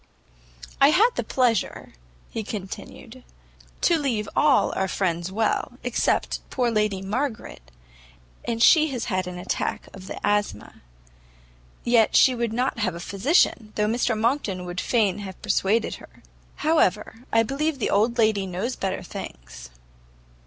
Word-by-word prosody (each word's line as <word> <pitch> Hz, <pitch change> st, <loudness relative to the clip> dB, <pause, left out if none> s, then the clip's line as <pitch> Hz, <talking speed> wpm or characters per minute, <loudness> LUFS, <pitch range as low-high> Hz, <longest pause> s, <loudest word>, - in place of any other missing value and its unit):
"I 275 Hz, -, +8 dB
had 430 Hz, +10 st, +4 dB
the -, -, -2 dB
pleasure," 240 Hz, -6 st, 0 dB, 0.4 s
he 225 Hz, -, -3 dB
continued, 220 Hz, +4 st, -8 dB, 0.6 s
"to 340 Hz, -2 st, +3 dB
leave 235 Hz, -8 st, -1 dB
all 295 Hz, -3 st, +3 dB
our 190 Hz, -, 0 dB
friends 175 Hz, -1 st, -2 dB
well, 220 Hz, +3 st, 0 dB
except -, -, 0 dB
poor 245 Hz, -3 st, 0 dB
Lady 210 Hz, -3 st, 0 dB
Margaret, 220 Hz, -, -4 dB, 0.7 s
and 230 Hz, -1 st, -1 dB
she 315 Hz, -1 st, +6 dB
has 245 Hz, -2 st, -3 dB
had 185 Hz, -1 st, -1 dB
an 180 Hz, 0 st, -6 dB
attack 180 Hz, -, -3 dB
of 190 Hz, -1 st, -11 dB
the -, -, -6 dB
asthma; 205 Hz, -, -1 dB, 1.0 s
yet 235 Hz, -2 st, +3 dB
she 260 Hz, -, +6 dB
would 235 Hz, -2 st, -2 dB
not 250 Hz, +1 st, -1 dB
have 185 Hz, -6 st, -1 dB
a -, -, -7 dB
physician, 215 Hz, -, +1 dB
though 210 Hz, -, +1 dB
Mr 225 Hz, 0 st, 0 dB
Monckton 220 Hz, -6 st, -1 dB
would 175 Hz, 0 st, -4 dB
fain 210 Hz, -5 st, +1 dB
have 190 Hz, -2 st, -8 dB
persuaded 215 Hz, +4 st, +1 dB
her: -, -, -17 dB, 0.3 s
however, 240 Hz, -, 0 dB
I 225 Hz, 0 st, +4 dB
believe 280 Hz, +5 st, -1 dB
the 240 Hz, -, -1 dB
old 225 Hz, +4 st, +2 dB
lady 215 Hz, -4 st, +2 dB
knows 190 Hz, +8 st, -3 dB
better 190 Hz, -2 st, -3 dB
things." -, -, -9 dB
215 Hz, 145 wpm, -24 LUFS, 190-250 Hz, 1.0 s, I